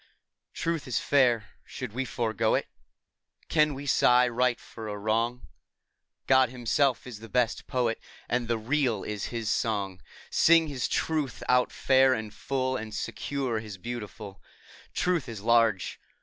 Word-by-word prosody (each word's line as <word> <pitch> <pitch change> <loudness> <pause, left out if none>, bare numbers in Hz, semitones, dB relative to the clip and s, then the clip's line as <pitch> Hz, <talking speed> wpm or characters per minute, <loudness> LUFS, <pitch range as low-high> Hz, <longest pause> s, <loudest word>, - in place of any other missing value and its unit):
Truth 165 -4 -2
is 125 - -1
fair; 120 -7 +2
should 125 -5 -7
we 130 +2 -2
forego 110 -1 0
it? - - -1 0.8
Can 150 -2 +3
we 140 +2 -7
sigh 125 -2 +5
right 125 0 +1
for 110 -1 -9
a 105 -1 -4
wrong? 115 +4 0 0.8
God 130 -2 +5
Himself 125 +2 +1
is 120 -5 -8
the 115 0 -11
best 120 +1 0
Poet, 120 -4 0 0.3
And 120 -1 -1
the 115 0 +1
Real 120 -2 0
is 105 -2 -4
His 115 -2 -4
song. 100 -4 -1 0.3
Sing 165 0 +5
His 130 -6 -2
Truth 155 -6 -1
out 125 0 +3
fair 130 -1 +4
and 110 -2 -6
full, 130 +1 -2
And 110 -3 -5
secure 135 -6 -2
His 105 -3 -8
beautiful. 105 -2 -7 0.5
Truth 175 -8 0
is 110 -4 -7
large. 115 -3 +2
120 Hz, 150 wpm, -28 LUFS, 110-130 Hz, 0.8 s, sigh